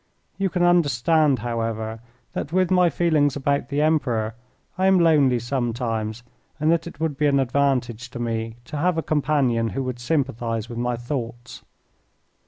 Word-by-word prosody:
You 195 -1 +1
can 180 -1 0
understand, 155 -3 +3
however, 115 -1 -3 0.3
that 145 - -4
with 185 +1 +2
my 180 -1 +5
feelings 150 -3 +2
about 140 -1 -1
the 145 +1 +1
Emperor 125 -9 +1 0.4
I 190 +1 +2
am 190 -1 +5
lonely 150 -7 +4
sometimes, 120 -2 -2 0.4
and 155 +2 +2
that 170 0 +1
it 160 - -10
would 160 -3 -1
be 150 - +3
an 140 -1 +3
advantage 125 -3 0
to 125 - -9
me 115 -1 -3
to 150 - -6
have 175 +3 +1
a 160 - 0
companion 135 -6 +1
who 135 - 0
would 125 -1 -4
sympathize 120 -5 -1
with 120 -1 -6
my 120 0 0
thoughts. 120 -1 -6
135 Hz, 165 wpm, -23 LUFS, 120-155 Hz, 0.4 s, my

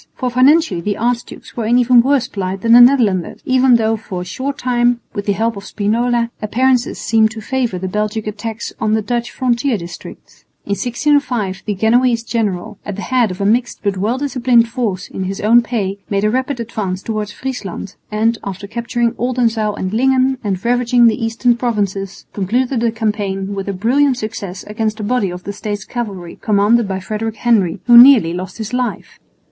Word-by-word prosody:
For 250 -2 -2
financially 260 - +3
the 205 +3 -2
archdukes 240 +1 -3
were 230 -3 -2
in 240 +2 +4
even 245 -1 +5
worse 265 -1 +1
plight 190 -1 -4
than 230 +1 +3
the 240 - +9
Netherlanders, 230 -9 +3
even 255 -1 +4
though 225 -1 +2
for 200 -4 -6
a - - -6
short 265 +9 -4
time, 245 -1 +1
with 205 -1 -5
the 200 - +3
help 225 +3 -1
of 200 - -8
Spinola, 235 +3 0
appearances 250 +3 +1
seemed 220 -1 +2
to 220 0 -8
favour 240 -2 -2
the 190 +1 -4
Belgic 210 +2 -2
attacks 220 +2 -5
on 215 0 +1
the 220 - -1
Dutch 240 +1 -2
frontier 245 0 0
districts. 170 -1 -11 0.2
In - - -6
1605 240 -2 0
the 205 - -1
Genoese 230 +3 +2
general, 210 -3 -3
at 205 - -5
the 205 - -6
head 250 -4 +1
of 185 +1 -6
a - - 0
mixed 235 +4 0
but 200 -2 0
well 210 +7 -1
disciplined 250 -4 +2
force 220 -7 -3
in 190 - -5
his 195 +2 -4
own 230 +3 +5
pay, 205 -5 -3
made 200 0 0
a 215 - +2
rapid 260 +1 -2
advance 205 -5 -4
towards 215 -2 -3
Friesland, 205 -7 -6 0.2
and, 225 +2 +1
after 195 0 -6
capturing 235 +2 -1
Oldenzaal 230 -4 0
and 185 +1 -4
Lingen 260 +2 +2
and 195 -1 -3
ravaging 245 0 +3
the 230 +1 +2
eastern 235 +2 +1
provinces, 200 -5 -3
concluded 240 +6 0
the 230 0 +1
campaign 205 -3 -2
with 195 0 -4
a - - 0
brilliant 255 +7 +2
success 205 -5 -6
against 215 +1 -3
a - - -4
body 215 -2 0
of 180 +1 -8
the 200 - -5
States 205 -1 -5
cavalry 200 -8 -6
commanded 215 +2 +2
by 190 -1 -3
Frederick 215 +3 -4
Henry, 215 -6 +1
who 240 - +6
nearly 240 -11 +6
lost 185 +2 -6
his 220 +1 -6
life. 250 -1 -3
225 Hz, 190 wpm, -17 LUFS, 200-245 Hz, 0.2 s, the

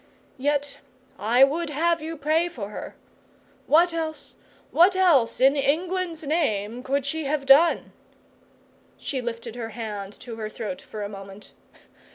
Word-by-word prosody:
Yet 285 +1 -1 0.4
I 240 +5 +4
would 310 +4 +2
have 330 +3 +1
you 320 +1 -5
pray 310 +4 +1
for 220 -12 -7
her! 210 - -8 0.7
What 335 +3 +4
else 315 -2 -4 0.4
what 360 +3 +5
else 335 -11 +3
in 270 +2 +5
England's 335 +3 -1
name 245 -8 -1
could 275 +1 -1
she 315 +2 -2
have 280 0 -1
done?' 285 +5 +5 1.1
She 265 -3 -3
lifted 230 -1 -6
her 230 -2 -5
hand 210 -3 -6
to 235 -3 -8
her 215 -1 -4
throat 210 -4 -6
for 210 -1 -7
a - - -3
moment. 195 0 -11
275 Hz, 145 wpm, -25 LUFS, 230-320 Hz, 1.1 s, what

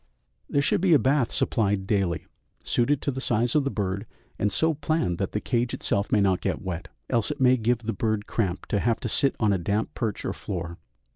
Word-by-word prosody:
There 140 - +2
should 145 - +2
be 180 -4 +5
a - - +8
bath 135 0 +2
supplied 100 -3 +1
daily, 95 -4 0 0.4
suited 130 +4 +1
to 140 - 0
the 130 0 -5
size 120 -1 +1
of 150 -2 +3
the - - +1
bird, 100 -4 -2 0.3
and 105 - +1
so 160 +9 +2
planned 150 - -1
that 95 - -1
the 105 - 0
cage 120 +2 0
itself 100 +1 -1
may 105 - +4
not 95 -2 +2
get - - -1
wet, 90 0 -4 0.2
else 115 -4 +1
it - - -4
may 130 -1 +5
give 120 0 0
the 115 +1 -2
bird 110 0 -1
cramp 95 -5 -2
to 105 - +1
have 115 +2 +1
to - - -2
sit 135 +4 +1
on 105 -3 +3
a 95 - 0
damp 105 +5 -1
perch 110 -4 -3
or - - -1
floor. 85 0 -5
110 Hz, 225 wpm, -26 LUFS, 100-130 Hz, 0.4 s, a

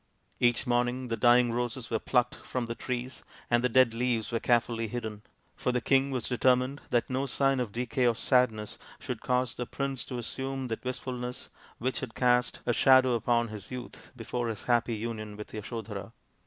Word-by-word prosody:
Each 120 -1 +3
morning 125 +1 0
the 115 - 0
dying 120 +1 +5
roses 120 0 -3
were 115 - +1
plucked 125 +4 +1
from 125 -2 -4
the 115 - -3
trees 125 +2 -4 0.3
and 120 0 +3
the 125 - +3
dead 130 -1 +5
leaves 120 -1 0
were 115 - 0
carefully 115 -1 +1
hidden. 110 -2 -5 0.3
For 125 - -1
the 125 - +1
king 135 +3 +3
was 130 -4 -2
determined 130 +2 +2
that 120 -2 +2
no 130 +2 -1
sign 135 0 +2
of 120 -5 -2
decay 125 +2 0
or 120 - +3
sadness 110 -4 +1 0.2
should - - -5
cause 125 -1 +1
the 125 - -5
prince 135 -2 -3
to 125 - -5
assume 130 +2 -4
that 115 - -4
wistfulness 125 -1 -5 0.3
which 130 +2 -2
had 120 -4 -6
cast 125 -1 +2
a 120 - +2
shadow 130 0 +6
upon 120 0 +1
his 105 -3 -7
youth 125 -1 -8
before 120 0 -3
his 110 -3 -4
happy 120 -1 +2
union 110 -1 -5
with 105 - -9
Yasodhara. 110 -1 -6
120 Hz, 185 wpm, -29 LUFS, 115-125 Hz, 0.3 s, shadow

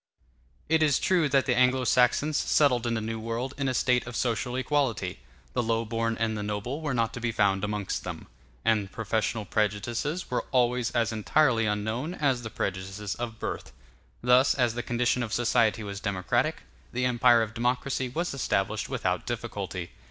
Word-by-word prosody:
] - - -36
It 160 0 +3
is 150 -3 +4
true 175 -5 +2
that 135 -1 +3
the 130 - +2
Anglo 130 +1 +3
Saxons 125 +5 +3
settled 125 -5 +3
in 115 - 0
the 110 - -1
New 110 +1 -3
World 115 +4 -3
in 135 -1 -1
a - - 0
state 125 -1 +2
of 125 - -6
social 120 +1 -1
equality; 130 -3 0 0.3
the - - +1
low 115 0 0
born 115 +1 -1
and 115 -1 0
the 105 - -3
noble 105 +8 -3
were 150 -4 -1
not 115 -1 0
to 125 - -6
be 120 -1 0
found 100 -3 +2
amongst 105 -1 -2
them; - - -6 0.4
and 105 -3 +2
professional 110 0 -1
prejudices 110 - -1
were 125 - -1
always 125 -1 +2
as 115 -1 +2
entirely 115 +1 +2
unknown 110 - -2
as 135 -6 +1
the 110 - -6
prejudices 95 +1 -3
of 120 -2 -5
birth. - - -5 0.5
Thus, 125 +2 +5
as 125 -4 +2
the 120 - -3
condition 120 +1 0
of 115 -2 -3
society 115 -2 +2
was 100 -1 -5
democratic, 100 -3 -1 0.3
the 125 +1 -1
empire 120 -1 +5
of 110 -1 -5
democracy 125 +2 -1
was 170 +6 -2
established 135 - -1
without - - -1
difficulty. - - -4
120 Hz, 180 wpm, -27 LUFS, 110-130 Hz, 0.5 s, Thus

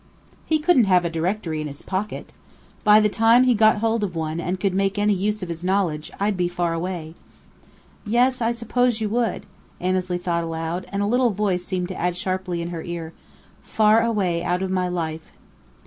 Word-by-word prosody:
"He 315 - +3
couldn't 300 -6 +4
have 180 -2 +3
a 170 - -1
directory 165 -1 -2
in 155 - -4
his 140 -1 -9
pocket! 195 +2 -4 0.5
By 210 -1 +7
the 215 - +4
time 225 +4 +4
he 255 -1 +4
got 215 -1 +4
hold 225 -1 +1
of 185 -4 -3
one 160 0 -2
and 180 +2 -2
could 195 -1 0
make 195 +1 0
any 205 0 +3
use 205 +1 -1
of 180 - -6
his 170 0 -6
knowledge, 180 -5 0
I'd 205 +1 +1
be 180 -1 0
far 175 -1 -1
away." 165 -2 -4 0.9
"Yes, 245 +3 +2
I 230 0 +2
suppose 235 0 0
you 215 -1 -1
would," 235 +1 -1 0.3
Annesley 185 0 -1
thought 170 -1 -1
aloud, 165 +2 -4
and 200 0 -1
a - - +1
little 245 +3 +3
voice 195 -3 -1
seemed 180 -1 -3
to 185 - -5
add 175 0 0
sharply 185 -2 -2
in 170 - -5
her 170 -2 -5
ear: 165 -1 -6 0.5
"Far 215 +1 +3
away 195 -7 0
out 180 +1 0
of 190 - -2
my 185 -1 0
life." 160 -3 -4
185 Hz, 200 wpm, -23 LUFS, 175-215 Hz, 0.9 s, By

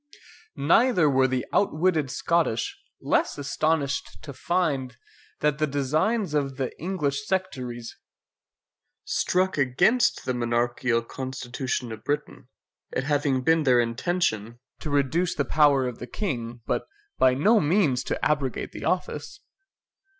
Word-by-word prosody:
Neither 180 - +4
were 130 -2 +4
the 130 -1 -1
outwitted 160 -6 +2
Scottish 155 -3 0 0.3
less - - +1
astonished 145 0 -1
to 140 - -8
find, 140 -7 -1 0.4
that 150 0 +1
the 155 - +2
designs 155 - 0
of 135 -3 -1
the 130 -2 -3
English 145 -6 -2
sectaries 125 -11 -3 1.1
struck 185 -3 0
against 175 - +2
the 130 - 0
monarchial 120 0 0
constitution 130 -2 -4
of 110 -1 -8
Britain, 145 -3 -3 0.4
it 130 - -1
having 145 -2 +1
been 160 +3 +4
their 130 -4 +4
intention 120 - -1 0.2
to 155 - -5
reduce 145 +5 +1
the 145 - 0
power 145 -2 +4
of 125 - -6
the 125 - -7
King, 120 - -4
but - - -2 0.3
by 130 -1 +5
no 210 - +4
means 150 -6 +2
to - - -2
abrogate 140 -4 -1
the - - -8
office. 180 - -2
140 Hz, 130 wpm, -25 LUFS, 125-160 Hz, 1.1 s, by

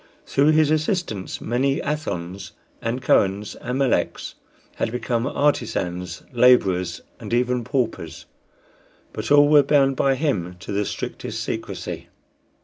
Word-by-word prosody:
Through 145 +3 +3
his 155 -1 +4
assistance 155 - -1
many 135 +4 0
Athons 95 - -4 0.3
and 120 +3 -3
Kohens 100 -3 +2
and 125 +1 -3
Meleks 135 -3 0 0.4
had 115 - -1
become 120 0 -1
artisans 95 - -1
laborers, 95 -9 +3 0.2
and - - -8
even 125 0 +1
paupers; 125 -1 -3 0.9
but 110 +1 -5
all 145 0 +7
were 150 -1 +7
bound 135 -1 +3
by 135 +1 +2
him 105 - -1
to 80 - -7
the 100 +1 0
strictest - - -5
secrecy. - - -5
125 Hz, 125 wpm, -23 LUFS, 100-140 Hz, 0.9 s, all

